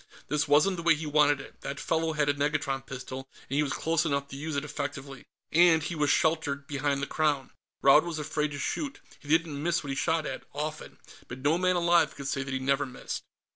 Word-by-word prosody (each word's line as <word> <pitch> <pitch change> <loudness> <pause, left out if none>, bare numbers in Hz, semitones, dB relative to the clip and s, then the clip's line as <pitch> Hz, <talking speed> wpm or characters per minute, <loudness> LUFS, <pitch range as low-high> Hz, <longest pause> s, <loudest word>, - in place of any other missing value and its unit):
This 150 +1 +1
wasn't 155 +6 +4
the - - -4
way 165 -1 +5
he 155 +1 -5
wanted 150 -1 +3
it; 140 - -12
that 140 +1 -5
fellow 160 0 0
had 150 -1 +1
a 145 - +3
negatron 145 -2 -1
pistol, 130 0 -7 0.2
and 135 - -3
he 150 - +3
was 145 -3 -1
close 165 0 +1
enough 140 -3 -1
to - - -8
use 155 +2 -4
it 140 +1 -1
effectively. 140 -2 -6 0.2
And 165 -1 +5
he 170 - -3
was 150 -3 +1
sheltered 155 -4 +1
behind 140 -1 -1
the - - +2
Crown; 145 -3 0 0.3
Raud 140 +2 +7
was 170 -2 -4
afraid 150 0 -1
to - - -5
shoot. 275 - -3 0.2
He - - -16
didn't 160 -2 +1
miss 170 +1 0
what 140 - -4
he - - -2
shot 160 +2 0
at 130 - -5
often. 155 +1 -5 0.3
But 120 - -7
no 155 +4 +3
man 185 0 +2
alive 170 -2 +3
could 140 -1 -6
say 140 -1 -1
that 135 0 -5
he 135 - 0
never 140 +1 +1
missed. 125 - -6
150 Hz, 230 wpm, -28 LUFS, 140-160 Hz, 0.3 s, Raud